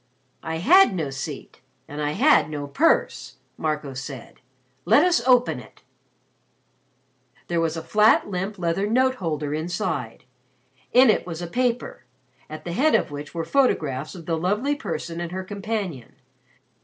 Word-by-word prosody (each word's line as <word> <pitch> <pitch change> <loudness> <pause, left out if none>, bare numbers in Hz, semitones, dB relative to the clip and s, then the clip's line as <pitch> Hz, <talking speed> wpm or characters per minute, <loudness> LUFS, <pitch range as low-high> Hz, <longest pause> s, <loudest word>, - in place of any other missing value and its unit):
"I 160 - -4
had 315 - +5
no 155 -6 -2
seat 135 0 -7 0.3
and 145 +1 -6
I 150 0 -1
had 195 - +4
no 145 -2 -4
purse," 300 - +1 0.2
Marco 150 -3 -3
said. 135 -1 -9 0.4
"Let 295 - +5
us 350 -9 +3
open 250 -1 +4
it." - - -16 1.6
There 170 -1 0
was 165 0 -1
a 160 - -5
flat 215 +5 +4
limp 195 +2 -4
leather 175 +3 -1
note 260 +3 +2
holder 150 -4 -2
inside. 160 - -3 0.7
In 250 -1 +7
it - - -2
was 165 -2 -5
a - - -3
paper, 245 +6 -2 0.4
at 155 0 -8
the 170 - -4
head 300 - +3
of - - 0
which 145 +3 -8
were 165 -1 -2
photographs 155 - 0
of 170 -3 -10
the 165 -1 -1
Lovely 210 - 0
Person 165 - -5
and 170 -1 -5
her 190 +1 -4
companion. 200 - -5
170 Hz, 155 wpm, -24 LUFS, 155-220 Hz, 1.6 s, In